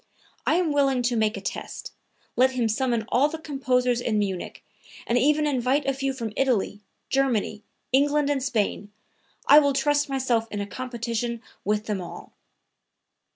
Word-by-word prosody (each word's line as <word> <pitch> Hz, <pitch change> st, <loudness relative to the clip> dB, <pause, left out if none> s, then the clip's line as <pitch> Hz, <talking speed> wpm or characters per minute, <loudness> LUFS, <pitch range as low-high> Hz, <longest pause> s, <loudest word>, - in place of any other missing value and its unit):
I 315 Hz, -, +4 dB
am 345 Hz, -3 st, +1 dB
willing 270 Hz, -3 st, +2 dB
to 240 Hz, 0 st, +1 dB
make 220 Hz, 0 st, +1 dB
a -, -, -6 dB
test; -, -, -6 dB, 0.4 s
let 260 Hz, +1 st, +4 dB
him 245 Hz, -3 st, +1 dB
summon 235 Hz, 0 st, 0 dB
all 280 Hz, +4 st, +3 dB
the 320 Hz, -, -5 dB
composers 255 Hz, -5 st, 0 dB
in 220 Hz, -3 st, 0 dB
Munich, 195 Hz, -3 st, -3 dB, 0.4 s
and 235 Hz, -, 0 dB
even 300 Hz, +5 st, +3 dB
invite 270 Hz, 0 st, +1 dB
a 275 Hz, -, +1 dB
few 270 Hz, 0 st, -1 dB
from 230 Hz, -5 st, -5 dB
Italy, 230 Hz, -6 st, 0 dB, 0.3 s
Germany, 245 Hz, -6 st, +1 dB, 0.3 s
England 290 Hz, +2 st, +3 dB
and 285 Hz, -2 st, 0 dB
Spain; 210 Hz, -5 st, -1 dB, 0.5 s
I 295 Hz, -, +9 dB
will 285 Hz, -2 st, +2 dB
trust 290 Hz, +1 st, +1 dB
myself 250 Hz, -4 st, 0 dB
in 205 Hz, -, -4 dB
a 200 Hz, -, -2 dB
competition 235 Hz, 0 st, -3 dB, 0.2 s
with 210 Hz, +1 st, 0 dB
them 210 Hz, -4 st, -2 dB
all." 175 Hz, -, -9 dB
255 Hz, 160 wpm, -25 LUFS, 225-275 Hz, 0.5 s, I